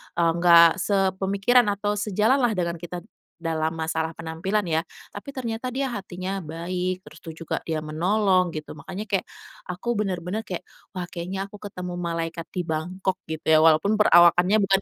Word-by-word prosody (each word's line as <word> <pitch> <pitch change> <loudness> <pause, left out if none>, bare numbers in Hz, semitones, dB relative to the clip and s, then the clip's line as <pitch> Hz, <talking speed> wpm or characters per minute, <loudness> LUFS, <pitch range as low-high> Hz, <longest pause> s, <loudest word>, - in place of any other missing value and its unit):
eee, 170 -1 +3
gak 170 0 +7
sepemikiran 200 +4 +2
atau 205 +1 -1
sejalan 215 +6 +2
lah 235 -4 +2
dengan 170 -2 -2
kita 175 +1 -7
d - - -23 0.3
dalam 160 -2 -1
masalah 160 0 -2
penampilan 185 +6 -2
ya, 160 -2 +1 0.3
tapi 205 +7 -8
ternyata 250 -2 -4
dia 265 0 -2
hatinya 190 -1 -4
baik, 180 +3 -4
terus - - -14
itu 165 0 -9
juga - - -2
dia 155 -1 -3
menolong 185 +3 +2
gitu. 155 -2 -7
Makanya 180 +8 -7
kayak 200 -4 0 0.5
aku 200 +7 -2
bener-bener 195 -1 -2
kayak, 185 -5 -6 0.2
wah 180 -1 -5
kayaknya 180 +3 -5
aku 200 +1 -13
ketemu 180 -3 -6
malaikat 165 -1 -3
di 180 -2 -3
Bangkok 180 +4 -2 0.2
gitu 160 -1 -5
ya, 155 0 +5
walaupun 165 +6 +4
perawakannya 175 -1 +6
bukan 195 -2 +3
180 Hz, 165 wpm, -25 LUFS, 165-200 Hz, 0.5 s, gak